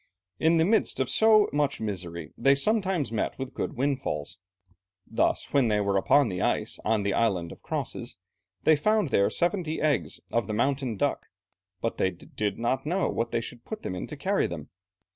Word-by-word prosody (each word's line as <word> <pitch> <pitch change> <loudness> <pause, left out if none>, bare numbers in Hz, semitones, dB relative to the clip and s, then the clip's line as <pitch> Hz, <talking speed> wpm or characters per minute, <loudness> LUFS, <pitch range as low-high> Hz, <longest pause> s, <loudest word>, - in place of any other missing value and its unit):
In 165 +1 +4
the 160 - +4
midst 220 -5 +2
of 130 - 0
so 220 -1 +5
much 145 -1 0
misery 85 -7 -4
they 135 +3 +4
sometimes 190 - +1
met 115 - -2
with 135 -1 -5
good - - -3
windfalls. 120 - -2 0.7
Thus, - - 0
when 135 -4 +4
they 105 -1 +2
were 100 -1 0
upon 135 +8 +4
the 90 -4 -3
ice - - 0
on 110 -1 +1
the 100 0 0
Island 95 -7 +1
of - - -12
Crosses - - -4 0.5
they 160 - +6
found 210 +3 +2
there 100 -5 +3
seventy 175 -3 0
eggs 150 -3 0
of 115 -4 0
the 110 - -2
mountain 130 -1 0
duck. - - -1 0.5
"But - - -2
they 95 - +3
did 100 +3 -4
not 120 +3 0
know 180 +5 0
what 115 0 -1
they 115 - -1
should 120 +1 -8
put 220 -1 -7
them - - -3
in 90 - -5
to 150 - -8
carry 195 +7 +1
them. 80 -4 -7
130 Hz, 190 wpm, -27 LUFS, 100-160 Hz, 0.7 s, they